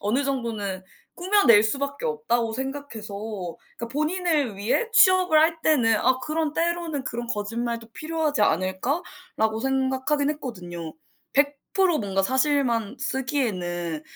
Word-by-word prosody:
어느 235 Hz, +8 st, 0 dB
정도는 225 Hz, -8 st, -3 dB, 0.3 s
꾸며낼 355 Hz, -, +5 dB
수밖에 280 Hz, -, -2 dB
없다고 445 Hz, -, 0 dB
생각해서 265 Hz, -5 st, -5 dB, 0.6 s
그러니까 235 Hz, -, -5 dB
본인을 305 Hz, -, 0 dB
위해 225 Hz, -, 0 dB
취업을 370 Hz, -7 st, +6 dB
할 325 Hz, +1 st, +3 dB
때는 245 Hz, -8 st, +4 dB
'아 260 Hz, +4 st, +2 dB
그런 310 Hz, +2 st, -2 dB
때로는 335 Hz, -4 st, -1 dB
그런 240 Hz, -1 st, -4 dB
거짓말도 230 Hz, +1 st, -3 dB
필요하지 310 Hz, -5 st, -1 dB
않을까.'라고 220 Hz, -, -1 dB
생각하긴 265 Hz, +2 st, 0 dB
했거든요. 175 Hz, -, -6 dB, 0.4 s
100% 295 Hz, +5 st, +1 dB
뭔가 195 Hz, -2 st, 0 dB
사실만 260 Hz, -2 st, +1 dB
쓰기에는 180 Hz, -, -2 dB
265 Hz, 300 characters per minute, -25 LUFS, 220-305 Hz, 0.6 s, 취업을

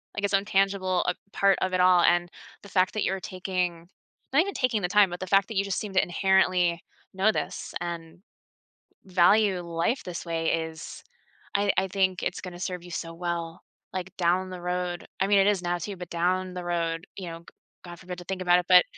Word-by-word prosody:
like 205 Hz, -, -4 dB
its 200 Hz, -, 0 dB
own 195 Hz, +1 st, +3 dB
tangible, 195 Hz, -2 st, +1 dB
uh, -, -, +1 dB, 0.2 s
part 195 Hz, -1 st, +3 dB
of 185 Hz, 0 st, 0 dB
it 185 Hz, -, +1 dB
all, 180 Hz, -1 st, +6 dB
and 175 Hz, 0 st, +3 dB, 0.3 s
the 200 Hz, -, -12 dB
fact 185 Hz, -1 st, +2 dB
that 215 Hz, -, -1 dB
you're 195 Hz, -, 0 dB
taking, 180 Hz, -2 st, -3 dB, 0.5 s
not 285 Hz, -, +6 dB
even 395 Hz, +2 st, -2 dB
taking 250 Hz, -5 st, 0 dB
the 180 Hz, -, 0 dB
time, 205 Hz, 0 st, +5 dB
but 175 Hz, 0 st, -6 dB
the 185 Hz, -, -5 dB
fact 195 Hz, +1 st, +4 dB
that 220 Hz, -, -4 dB
you 195 Hz, -, +3 dB
just 195 Hz, -2 st, -2 dB
seem 210 Hz, -2 st, -5 dB
to 190 Hz, -, +5 dB
inherently 180 Hz, -2 st, +2 dB, 0.3 s
know 195 Hz, +3 st, +3 dB
this -, -, -4 dB
and 170 Hz, -1 st, -6 dB, 0.9 s
value 190 Hz, +2 st, +4 dB
life 170 Hz, +9 st, -1 dB
this 175 Hz, -1 st, -6 dB
way 165 Hz, -1 st, -2 dB, 0.2 s
is 160 Hz, 0 st, -10 dB, 0.5 s
I 200 Hz, 0 st, +3 dB
I 190 Hz, -, +2 dB
think 185 Hz, -1 st, 0 dB
it's 180 Hz, -, -2 dB
gonna 180 Hz, -2 st, -8 dB
serve 180 Hz, -1 st, -4 dB
you 175 Hz, -, -11 dB
so 165 Hz, 0 st, -5 dB
well, 170 Hz, -1 st, -4 dB, 0.3 s
like, 185 Hz, 0 st, -5 dB
down 180 Hz, +1 st, +1 dB
the 180 Hz, -1 st, -7 dB
road, 180 Hz, 0 st, -3 dB
I 190 Hz, -, +2 dB
mean 200 Hz, 0 st, +5 dB
it 195 Hz, -, +4 dB
is 205 Hz, -3 st, +2 dB
now, 175 Hz, 0 st, -1 dB
too, 190 Hz, +3 st, -6 dB
but 180 Hz, -1 st, -8 dB
down 180 Hz, +2 st, 0 dB
the 180 Hz, -1 st, -5 dB
road, 170 Hz, -1 st, -2 dB
you 185 Hz, -3 st, -5 dB
know, 165 Hz, -, -7 dB
g -, -, -25 dB, 0.4 s
god 175 Hz, 0 st, -9 dB
forbid 180 Hz, -1 st, -7 dB
to 175 Hz, -, -11 dB
think 190 Hz, -1 st, -4 dB
about 180 Hz, 0 st, +5 dB
it, 180 Hz, -, -4 dB
but 180 Hz, -1 st, +9 dB
185 Hz, 220 wpm, -27 LUFS, 175-195 Hz, 0.9 s, but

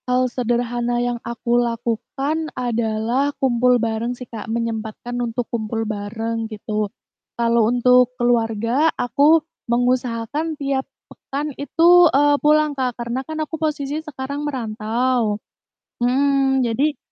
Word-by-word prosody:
Hal 250 Hz, +1 st, +3 dB
sederhana 240 Hz, 0 st, -1 dB
yang 240 Hz, -1 st, -1 dB
aku 235 Hz, +1 st, 0 dB
lakukan, 245 Hz, +6 st, -2 dB
adalah, 235 Hz, +2 st, 0 dB
kumpul 250 Hz, -1 st, +3 dB
bareng 230 Hz, +1 st, -2 dB
sih 250 Hz, -, -8 dB
Kak, 225 Hz, -2 st, -8 dB
menyempatkan 230 Hz, 0 st, -3 dB
untuk 240 Hz, 0 st, -2 dB
kumpul 225 Hz, 0 st, -2 dB
bareng, 225 Hz, +2 st, -3 dB
gitu. 215 Hz, -1 st, -3 dB, 0.5 s
Kalau 230 Hz, -1 st, +3 dB
untuk 250 Hz, 0 st, +4 dB
keluarga, 235 Hz, +4 st, +2 dB
aku 290 Hz, +6 st, +3 dB, 0.2 s
mengusahakan 245 Hz, +5 st, 0 dB
tiap 275 Hz, -2 st, -2 dB, 0.2 s
pekan 290 Hz, +2 st, -5 dB
itu, 340 Hz, +4 st, +5 dB
eee, 290 Hz, +1 st, +4 dB
pulang 305 Hz, 0 st, +3 dB
Kak, 255 Hz, -3 st, -2 dB
karena 240 Hz, +2 st, -3 dB
kan 315 Hz, +3 st, -7 dB
aku 320 Hz, +1 st, -7 dB
posisi 300 Hz, -1 st, -1 dB
sekarang 280 Hz, -2 st, -5 dB
merantau. 235 Hz, -3 st, -1 dB, 0.6 s
Mhm, 270 Hz, +1 st, +2 dB
jadi 275 Hz, +6 st, 0 dB
245 Hz, 120 wpm, -21 LUFS, 230-275 Hz, 0.6 s, itu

